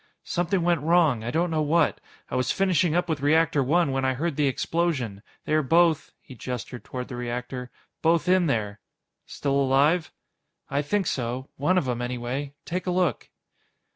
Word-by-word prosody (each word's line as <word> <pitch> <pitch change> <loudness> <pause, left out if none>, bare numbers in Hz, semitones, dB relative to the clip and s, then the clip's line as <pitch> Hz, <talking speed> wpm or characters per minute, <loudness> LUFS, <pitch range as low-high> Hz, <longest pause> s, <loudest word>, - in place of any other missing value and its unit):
"Something 175 +1 0
went 170 -3 +2
wrong. 155 -7 +3
I 115 - -3
don't 165 +6 0
know 155 -1 +1
what. 155 +3 +2 0.3
I - - -2
was 130 - +1
finishing 185 -4 +2
up 175 0 +1
with 155 -4 -2
Reactor 150 0 +3
One 155 +2 +2
when 135 0 -1
I 130 0 +1
heard 160 +3 -2
the 145 0 +2
explosion. 135 - -1 0.2
They - - -1
are 155 - +4
both" 165 +1 +3
he - - -12
gestured 125 0 -6
toward 125 -1 -6
the 125 - -7
reactor 125 +1 -5 0.3
"both 165 +1 +2
in 185 -1 +4
there." 105 -6 -1 0.5
"Still 140 -1 0
alive?" 145 +5 +2 0.6
"I 140 - +1
think 195 +7 0
so. 125 -2 -3
One 165 +7 +1
of 150 - +1
'em, 120 -1 -2
anyway. 125 +3 -4
Take 180 +2 -4
a - - +2
look." 180 -1 0
145 Hz, 180 wpm, -25 LUFS, 125-170 Hz, 0.6 s, are